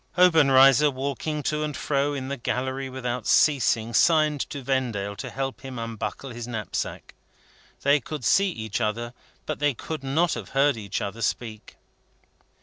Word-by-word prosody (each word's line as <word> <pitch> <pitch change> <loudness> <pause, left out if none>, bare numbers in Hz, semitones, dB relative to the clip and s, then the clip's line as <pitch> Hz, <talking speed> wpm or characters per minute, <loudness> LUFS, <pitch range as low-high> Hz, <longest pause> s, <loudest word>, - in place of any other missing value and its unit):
Obenreizer, 145 -5 +6
walking 140 +3 -3
to 150 +1 -1
and 150 -2 -3
fro 145 0 0
in 130 -1 -4
the 140 - -3
gallery 130 +1 -3
without 125 -2 -4
ceasing, 120 -6 +3
signed 155 +2 +3
to 140 -2 -6
Vendale 120 -7 -1
to - - -5
help 135 0 -4
him 130 -2 -7
unbuckle 115 +3 -5
his 120 0 -7
knapsack. 110 -4 -4 0.7
They 140 +1 +4
could 145 -1 -6
see 200 0 +4
each 110 - -4
other, 120 +2 -2 0.3
but - - -4 0.2
could 155 -3 -6
not 155 +5 +1
have - - -6
heard 140 0 +4
each 105 -3 -4
other 105 +3 -5
speak. 110 -2 -4
135 Hz, 150 wpm, -25 LUFS, 120-145 Hz, 0.7 s, Obenreizer